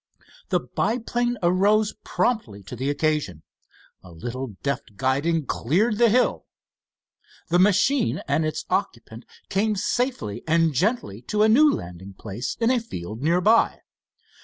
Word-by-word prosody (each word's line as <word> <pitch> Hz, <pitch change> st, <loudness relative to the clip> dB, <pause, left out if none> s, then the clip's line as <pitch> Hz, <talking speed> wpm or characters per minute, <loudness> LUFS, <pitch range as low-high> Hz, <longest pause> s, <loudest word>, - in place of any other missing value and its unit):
The -, -, +2 dB
biplane 240 Hz, +1 st, -1 dB
arose 205 Hz, +4 st, +3 dB
promptly 120 Hz, -, -1 dB
to 110 Hz, -, -8 dB
the 130 Hz, +4 st, -2 dB
occasion. 145 Hz, -, -1 dB, 0.6 s
A 90 Hz, -, -14 dB
little 120 Hz, +7 st, -6 dB
deft 140 Hz, -6 st, -3 dB
guiding 140 Hz, +6 st, 0 dB
cleared 205 Hz, -, 0 dB
the 235 Hz, -1 st, +5 dB
hill. 245 Hz, +4 st, +1 dB, 1.0 s
The 175 Hz, +1 st, +3 dB
machine 210 Hz, +7 st, +3 dB
and 145 Hz, +3 st, +1 dB
its 155 Hz, 0 st, -3 dB
occupant -, -, -3 dB, 0.2 s
came 210 Hz, +2 st, +1 dB
safely 205 Hz, -, -2 dB
and 165 Hz, -1 st, +3 dB
gently 135 Hz, -, -1 dB
to 210 Hz, 0 st, +2 dB
a -, -, +5 dB
new 295 Hz, +7 st, +6 dB
landing 90 Hz, +3 st, -7 dB
place 105 Hz, +4 st, -5 dB
in 230 Hz, +1 st, +2 dB
a 255 Hz, -, +2 dB
field 110 Hz, -, -7 dB
nearby. 180 Hz, +9 st, +3 dB
165 Hz, 135 wpm, -24 LUFS, -, 1.0 s, new